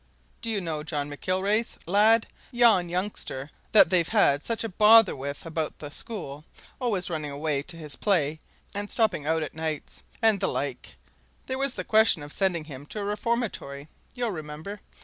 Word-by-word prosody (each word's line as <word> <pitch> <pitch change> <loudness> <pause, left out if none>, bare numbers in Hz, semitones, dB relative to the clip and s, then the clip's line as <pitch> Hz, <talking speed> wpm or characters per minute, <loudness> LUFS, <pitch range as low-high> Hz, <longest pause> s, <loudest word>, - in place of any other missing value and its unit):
Do 230 - -4
you 210 -3 0
know 160 -4 -3
John 145 -2 -3
McIlwraith's 195 +8 -1
lad 215 +5 +4 0.3
yon 230 -8 +4
youngster 175 -6 -3 0.2
that 195 -5 +7
they've 175 -3 +3
had 150 -10 +3
such 230 -1 -2
a 225 - -3
bother 215 +2 +6
with 140 +3 -6
about 160 -1 -2
the 145 -1 -8
school 155 - -3 0.4
always 205 -8 0
running 155 -3 -3
away 145 0 -1
to 165 +3 -9
his 150 -3 -5
play, 160 -7 +1 0.3
and 205 0 -3
stopping 195 -10 +1
out 160 0 +1
at 150 - -6
nights, 160 -2 -4 0.2
and 220 -3 +4
the - - +1
like 135 -3 -4 0.5
there 260 0 -3
was 275 -2 +1
the - - -3
question 215 -8 +4
of 145 - -9
sending 185 -5 +1
him 145 -1 -10
to 210 - -6
a - - -3
reformatory, 205 - -3 0.3
you'll 240 -3 -1
remember? 155 +4 -7
180 Hz, 175 wpm, -26 LUFS, 150-215 Hz, 0.5 s, that